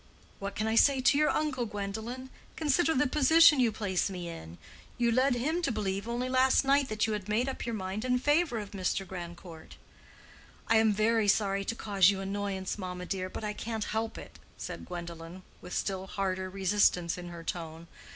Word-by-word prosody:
"What 200 0 -5
can 215 - -1
I 220 - 0
say 270 +4 +5
to 260 +2 +4
your 305 - +4
uncle, 260 -6 -1
Gwendolen? 220 +6 -5 0.2
Consider 320 +2 +2
the 265 - +3
position 305 +2 +6
you 240 -3 +3
place 200 -3 -1
me 180 -3 -6
in. 85 - -9 0.4
You 235 -1 +2
led 255 +2 +3
him 310 +9 -1
to 335 - 0
believe 200 -1 -2
only 240 +2 -2
last 260 +1 +3
night 275 0 +3
that 215 0 0
you 220 - -1
had 210 -1 -5
made 230 +5 +1
up 265 -2 -4
your 235 - -2
mind 190 +2 -4
in 250 0 +2
favor 290 0 +2
of 205 -2 -6
Mr. 195 0 -2
Grandcourt." 175 -2 -9 0.9
"I 225 - +4
am 220 -1 +4
very 215 +1 +2
sorry 200 -1 +2
to 230 - -2
cause 200 -5 +3
you 200 -1 0
annoyance, 195 0 -3
mamma, 180 -1 -5
dear, 185 0 -3
but 220 - -7
I 210 0 -2
can't 220 0 -4
help 225 0 -2
it," - - -11 0.2
said - - -7
Gwendolen, 170 0 -8 0.2
with - - -7
still 190 -1 -3
harder 190 -1 -2
resistance 190 -3 +2
in 175 -1 -8
her 170 -1 -9
tone. 165 -1 -5
210 Hz, 195 wpm, -30 LUFS, 190-250 Hz, 0.9 s, position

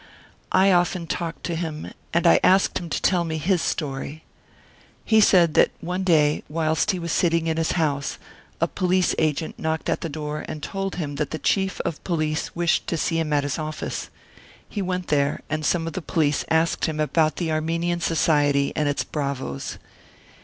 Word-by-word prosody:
I 195 +1 +5
often 175 -1 +2
talked 165 0 -4
to 170 - -2
him, 160 -2 -4 0.2
and 170 0 +1
I 170 - +6
asked 190 +1 +4
him 170 - -7
to - - -1
tell 180 -2 +3
me 160 -1 -3
his 175 +3 +1
story. 150 0 -3 0.8
He 220 -1 +5
said 175 -6 +5
that - - +5
one 180 +3 -3
day, 155 -5 +3
whilst 160 0 0
he 185 - +2
was 170 -2 -4
sitting 165 -1 +2
in 160 -1 0
his 165 -1 +1
house, 145 -5 -1 0.4
a - - +2
police 185 0 +1
agent 155 0 -1
knocked 160 0 -2
at - - 0
the 165 - -3
door 150 0 -4
and 150 - -6
told 195 -1 -3
him 145 -5 -4
that 150 -2 -1
the 155 - -3
Chief 190 +5 0
of 155 - -4
Police 155 -3 -1
wished 170 -1 +1
to 170 - -1
see 165 +1 0
him 160 -2 -1
at 145 -1 +2
his 145 0 -2
office. 155 0 -4 0.6
He 205 - -4
went 185 -1 -3
there, 145 -1 +1
and 155 0 -1
some 165 +2 +1
of 165 - -4
the 185 - -3
police 155 -4 0
asked 160 +1 +2
him 155 -2 -3
about 155 +1 +2
the 165 -3 -2
Armenian 165 +2 0
Society 145 -4 +2
and 150 -1 +1
its 145 - 0
bravoes. 140 -2 -4
160 Hz, 190 wpm, -24 LUFS, 150-175 Hz, 0.8 s, I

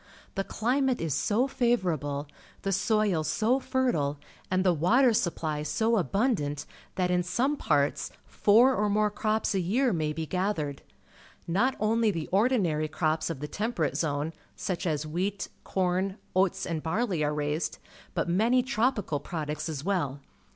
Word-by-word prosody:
The 195 - -1
climate 255 +5 0
is 160 -4 -1
so 220 - +2
favourable, 175 - 0 0.4
the 195 - 0
soil 200 -3 +2
so 230 - +1
fertile, 240 - 0 0.3
and 185 0 +2
the 180 - +5
water 230 - +4
supply 160 -6 -1
.so 220 +10 +1
abundant, 195 - 0 0.3
that 180 -1 +1
in 180 0 +3
some 240 +12 0
parts 145 - +1 0.2
four 235 +6 +4
or 210 0 +1
more 210 +1 +2
crops 215 0 0
a 195 - +1
year 230 +7 +1
maj^ 155 -2 -1
be 160 0 -3
gathered. 165 -6 -2 0.7
Not 200 +10 +2
only 225 +1 +2
the 165 -6 -2
ordinary 190 -8 +2
crops 155 +1 0
of 155 -5 -5
the 150 - -3
Temperate 195 - -1
Zone, 150 +1 -1 0.2
such 185 -3 -3
as 155 -2 -1
wheat, 185 +6 -2
corn, 190 +1 0 0.2
oats, 190 0 +2
and 165 -3 -2
barley, 185 0 0
are 150 - +1
raised, 150 +2 -2 0.4
but - - 0
many 225 +8 +3
tropical 230 - 0
products 150 0 -4
as 145 -3 -4
well. 165 -8 -1
185 Hz, 150 wpm, -28 LUFS, 155-220 Hz, 0.7 s, the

